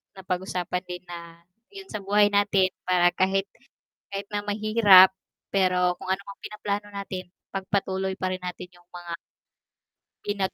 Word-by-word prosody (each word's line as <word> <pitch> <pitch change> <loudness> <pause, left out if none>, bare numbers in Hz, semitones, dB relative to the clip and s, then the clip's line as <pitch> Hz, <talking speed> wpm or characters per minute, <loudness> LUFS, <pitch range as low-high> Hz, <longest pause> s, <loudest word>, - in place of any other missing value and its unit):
na 190 - -10
pag-usapan 180 -1 -2
din 180 0 -6
na 170 -1 -9 0.3
yun 390 -1 -10
sa 210 -3 -6
buhay 205 +1 +4
natin 200 -2 +3 0.2
para 180 -1 +4
kahit 195 +1 +1 0.6
kahit 200 0 -4
na 205 0 -2
mahirap 205 -2 +7 0.4
pero 180 -2 +3
kung 185 - -7
ano 190 +1 0
ang 200 - -10
pinaplano 205 -1 -4
natin, 190 -3 -6 0.2
pagpatuloy 190 -1 -1
pa 185 - -1
rin 185 - -8
natin 180 0 -6
yung 175 0 -22
mga 175 -1 -7 1.1
ginag 200 -2 -1
190 Hz, 150 wpm, -26 LUFS, 180-205 Hz, 1.1 s, mahirap